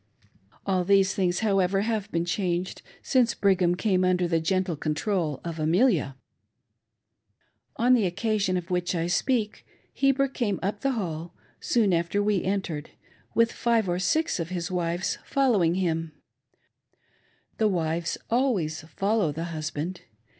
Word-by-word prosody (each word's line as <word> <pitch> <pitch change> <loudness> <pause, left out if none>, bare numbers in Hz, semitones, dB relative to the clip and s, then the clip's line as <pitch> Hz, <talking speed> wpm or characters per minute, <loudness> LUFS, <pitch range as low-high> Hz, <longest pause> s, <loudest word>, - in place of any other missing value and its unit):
All 185 -2 +1
these 195 +1 +3
thitigs, 180 -1 0
however, 195 -2 +2
have 215 -2 -2
been 170 0 0
changed 180 0 -2 0.2
since 250 -3 +2
Brigham 185 -3 +2
came 185 -1 +1
under 180 -1 +2
the 165 -1 +1
gentle 185 +1 0
control 155 - -1
of 165 -1 -5
Amelia. 165 - +2 1.6
On 245 +2 +3
the 225 -6 +3
occasion 195 0 0
of 180 +1 -6
which 180 0 0
I 165 -1 0
speak, 215 +5 0 0.3
Heber 275 0 +2
came 235 -7 -2
up 205 +2 -2
the 275 -1 +1
Hall, 170 -6 -4 0.2
soon 215 -6 +2
after 170 +4 +1
we 205 -3 +1
entered, 185 -6 -2 0.5
with 230 0 +4
five 230 -4 +1
or 175 0 0
six 315 - +1
of 165 0 -3
his 175 -1 -4
wives 175 0 -1
following 215 -12 +2
him, 165 -3 -1 1.5
The 220 - +4
wives 170 -3 -1
always 225 - 0 0.2
follow 200 -4 +1
the 160 +3 -4
husband. 155 +3 -4
185 Hz, 140 wpm, -26 LUFS, 170-210 Hz, 1.6 s, with